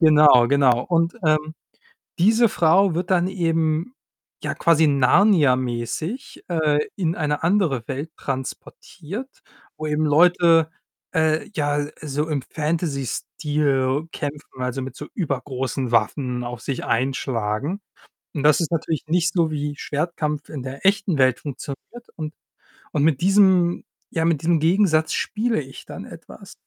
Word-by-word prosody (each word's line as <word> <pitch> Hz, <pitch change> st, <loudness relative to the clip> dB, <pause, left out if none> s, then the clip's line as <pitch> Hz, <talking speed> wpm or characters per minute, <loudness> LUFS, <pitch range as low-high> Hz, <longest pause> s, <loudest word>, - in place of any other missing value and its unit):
genau, 150 Hz, -6 st, +6 dB
genau. 135 Hz, -4 st, +4 dB
Und, 165 Hz, -1 st, +1 dB
ähm, 155 Hz, 0 st, +1 dB, 0.6 s
diese 220 Hz, +6 st, +4 dB
Frau 180 Hz, +1 st, +3 dB
wird 175 Hz, +2 st, -3 dB
dann 180 Hz, 0 st, +3 dB
eben, 165 Hz, +3 st, -1 dB, 0.5 s
ja, -, -, -2 dB
quasi 160 Hz, -1 st, +3 dB
Narnia-mäßig, 140 Hz, -, +1 dB
äh, 155 Hz, -3 st, +1 dB, 0.2 s
in 170 Hz, -4 st, 0 dB
eine 150 Hz, -2 st, -2 dB
andere 165 Hz, -, +1 dB
Welt 145 Hz, +5 st, -5 dB
transportiert, 165 Hz, -, -7 dB, 0.4 s
wo 155 Hz, -, -4 dB
eben 150 Hz, +1 st, 0 dB
Leute, 165 Hz, +1 st, +4 dB, 0.4 s
äh, 160 Hz, -1 st, +1 dB
ja, 145 Hz, -3 st, 0 dB
äh, 145 Hz, +1 st, -5 dB
so 150 Hz, +2 st, -2 dB
im 145 Hz, -4 st, -1 dB
Fantasy-Stil 150 Hz, -2 st, -1 dB
kämpfen, 145 Hz, -2 st, -6 dB
also, 125 Hz, +1 st, -2 dB
mit 130 Hz, -1 st, -7 dB
so 150 Hz, -, -7 dB
übergroßen 135 Hz, -, -3 dB
Waffen 125 Hz, +3 st, 0 dB
auf 120 Hz, -1 st, -6 dB
sich 130 Hz, +1 st, -4 dB
einschlagen. 125 Hz, -, -1 dB, 0.5 s
Und 145 Hz, -, -3 dB
das 150 Hz, +2 st, +5 dB
ist 165 Hz, -, -2 dB
natürlich 160 Hz, -2 st, -2 dB
nicht 170 Hz, 0 st, +1 dB
so, 165 Hz, -3 st, +1 dB
wie 145 Hz, -1 st, -3 dB
Schwertkampf 150 Hz, 0 st, -3 dB
in 145 Hz, -, -6 dB
der 135 Hz, +6 st, -8 dB
echten 195 Hz, -4 st, +2 dB
Welt 130 Hz, -2 st, +3 dB
funktioniert. 145 Hz, -, -8 dB
Und 155 Hz, -1 st, -6 dB, 0.6 s
und 145 Hz, -, +1 dB
mit 150 Hz, -3 st, +3 dB
diesem 185 Hz, -2 st, +4 dB, 0.3 s
ja, 160 Hz, -, -1 dB
mit 165 Hz, -4 st, +1 dB
diesem 165 Hz, -1 st, +2 dB
Gegensatz 160 Hz, -2 st, +3 dB
spiele 225 Hz, -2 st, -1 dB
ich 135 Hz, -1 st, -11 dB
dann -, -, -8 dB
etwas. -, -, -12 dB
155 Hz, 135 wpm, -22 LUFS, 135-170 Hz, 0.6 s, genau